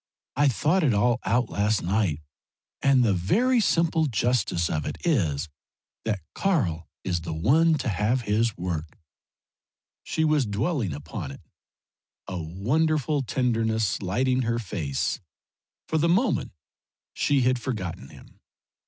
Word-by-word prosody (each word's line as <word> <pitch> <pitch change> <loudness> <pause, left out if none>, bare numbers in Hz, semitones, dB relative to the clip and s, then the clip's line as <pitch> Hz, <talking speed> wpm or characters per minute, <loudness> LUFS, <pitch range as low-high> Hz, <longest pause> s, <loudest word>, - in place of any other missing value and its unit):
I 145 +2 +4
thought 150 - +2
it 130 -8 +3
all 120 +4 +2
out 125 +2 +1
last 105 +1 +1
night, 90 -4 0 0.6
and 135 -2 +4
the 105 - +3
very 225 - +2
simple 165 -6 +2
justice 115 -7 +1
of 75 -2 -2
it - - -4
is 85 - +1 0.6
that 105 -4 -1
Karl 95 - 0 0.2
is 90 -2 -1
the 80 -1 -5
one 155 - +4
to - - -4
have 105 +5 +1
his 110 0 0
work." 85 -3 -4 1.0
She 160 - -1
was 150 -5 +2
dwelling 110 - -1
upon 75 -1 -6
it, 70 - -10 0.9
a 90 -2 -4
wonderful 145 - 0
tenderness 115 -5 0
lighting 125 +7 +1
her 115 -1 0
face; 90 - -2 0.7
for 160 - 0
the 170 +2 +2
minute 195 +3 +2 0.6
she 140 -2 +2
had 125 0 +2
forgotten 95 - -5
him. - - -16
115 Hz, 135 wpm, -26 LUFS, 90-145 Hz, 1.0 s, I